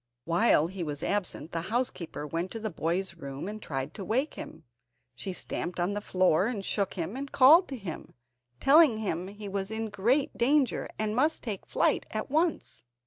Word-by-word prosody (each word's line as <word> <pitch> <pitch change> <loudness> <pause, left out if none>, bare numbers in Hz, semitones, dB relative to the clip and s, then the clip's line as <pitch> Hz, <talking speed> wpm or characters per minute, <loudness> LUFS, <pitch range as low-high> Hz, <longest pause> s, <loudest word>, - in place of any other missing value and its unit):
While 170 -2 +4
he 185 +2 -6
was 150 -2 -4
absent 180 -6 -2
the 165 - -2
housekeeper 215 - -2
went 165 +5 -3
to 225 - -4
the 220 -1 -3
boy's 170 +4 -1
room 140 +1 -6
and 215 +1 -6
tried 135 -2 -4
to 200 - -7
wake 255 - 0
him. 160 - -9 0.5
She 195 - -6
stamped 180 -1 -4
on 175 +3 0
the 205 - -3
floor, 185 -1 +2
and 210 -5 -3
shook 200 -2 -1
him 180 +3 -3
and 275 +1 -5
called 310 +8 +7
to 270 - -6
him, 190 -8 -8 0.4
telling 285 -4 +6
him 185 -4 -2
that 200 - -9
he 210 -1 -7
was 195 0 -3
in 220 0 -3
great 245 +8 +1
danger, 270 +1 +2
and 215 0 -1
must 300 +6 +1
take 210 -6 -4
flight - - +1
at - - -4
once. 320 - 0
200 Hz, 195 wpm, -29 LUFS, 170-240 Hz, 0.5 s, called